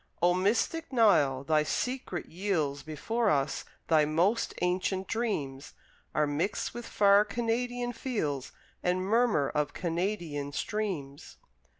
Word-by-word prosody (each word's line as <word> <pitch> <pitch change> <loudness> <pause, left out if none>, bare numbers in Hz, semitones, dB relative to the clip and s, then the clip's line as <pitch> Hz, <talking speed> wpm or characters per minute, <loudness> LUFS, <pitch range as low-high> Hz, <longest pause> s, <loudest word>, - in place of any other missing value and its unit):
O 175 +1 +4
mystic 220 - 0
Nile! 150 - +4
Thy 155 +1 +3
secret 220 - -2
yields 160 -6 -1
Before 215 +10 -1
us; 140 -3 0 0.2
thy 155 -2 +5
most 175 +10 +1
ancient 185 +1 0
dreams 150 - -3 0.4
Are 150 - +3
mixed 150 +8 -1
with 240 0 -7
far 200 0 +5
Canadian 240 +3 -2
fields 150 - -3 0.3
And 180 +1 0
murmur 215 - +3
of 150 -1 0
Canadian 170 -5 -2
streams. 175 -10 -4
185 Hz, 115 wpm, -30 LUFS, 150-225 Hz, 0.4 s, thy